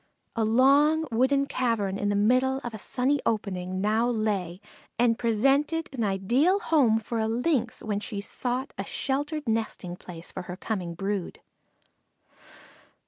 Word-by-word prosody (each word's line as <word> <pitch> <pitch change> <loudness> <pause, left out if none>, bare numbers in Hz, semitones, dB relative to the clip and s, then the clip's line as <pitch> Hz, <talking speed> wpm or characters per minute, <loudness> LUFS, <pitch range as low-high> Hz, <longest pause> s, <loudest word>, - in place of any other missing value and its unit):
A 230 - +1
long 280 +7 +4
wooden 265 +4 +2
cavern 225 -8 -1
in 205 - 0
the 205 - +1
middle 255 +6 +3
of 240 - -5
a 215 - -6
sunny 265 +7 0
opening, 195 -5 -2
it 185 - -4
now 215 +5 +1
lay, 205 -6 -1 0.4
and 230 -1 +3
presented 275 +8 +2
an 245 -4 -2
ideal 235 - +2
home 270 - +3
for 225 +1 -4
a 220 - +1
Lynx 245 +1 0
when 205 -2 -1
she 210 -1 -5
sought 250 +6 -3
a - - -1
sheltered 290 +1 -2
nesting 220 -5 -2
place 170 -2 -10
for 185 - -5
her 180 - -5
coming 185 -5 -3
brood. 195 0 -3
225 Hz, 150 wpm, -27 LUFS, 205-265 Hz, 0.4 s, long